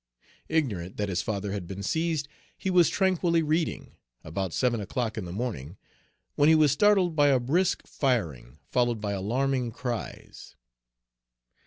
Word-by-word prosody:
Ignorant 105 - -1
that 105 -1 -1
his 95 +1 0
father 105 -2 -3
had 95 -4 -4
been 95 +2 -6
seized, 160 - -1 0.3
he 190 - -2
was 175 -3 +5
tranquilly 175 -3 +2
reading, 155 +2 -1 0.3
about 95 +3 -3
seven 120 +2 0
o'clock 110 +2 -3
in 110 - -4
the 85 - -7
morning, 95 - -4 0.6
when 145 +2 +4
he 160 - +7
was 155 -3 +5
startled 185 +1 +3
by 145 -1 +4
a 135 -2 +4
brisk 170 +10 0
firing, 80 - -2
followed 120 -2 +1
by 105 -1 -3
alarming 125 +6 0
cries. 120 -1 -6
125 Hz, 150 wpm, -27 LUFS, 100-155 Hz, 0.6 s, he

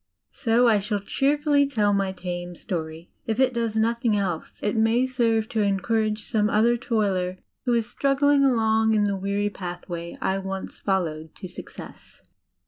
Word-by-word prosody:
So 240 0 +2
I 215 -3 +4
shall 205 +1 -1
cheerfully 285 +6 +2
tell 210 -6 +1
my 195 -1 +1
tame 175 -1 -5
story. 165 -3 -5 0.2
If 225 +1 -1
it 260 -1 +3
does 230 -2 -1
nothing 230 0 +1
else, 180 -5 -3
it 205 - 0
may 225 +3 +3
serve 230 -4 +1
to 225 -3 0
encourage 215 +2 0
some 215 -2 +1
other 230 +3 +3
toiler 200 -7 -1 0.3
who 245 - +2
is 230 -2 +2
struggling 280 +2 +2
along 220 -3 +3
in 210 - +3
the 200 -1 +1
weary 200 +2 -1
pathway 175 -2 -6
I 190 +1 0
once 190 0 -6
followed 160 -5 -2
to 190 - -8
success. - - -11
215 Hz, 160 wpm, -25 LUFS, 190-235 Hz, 0.3 s, I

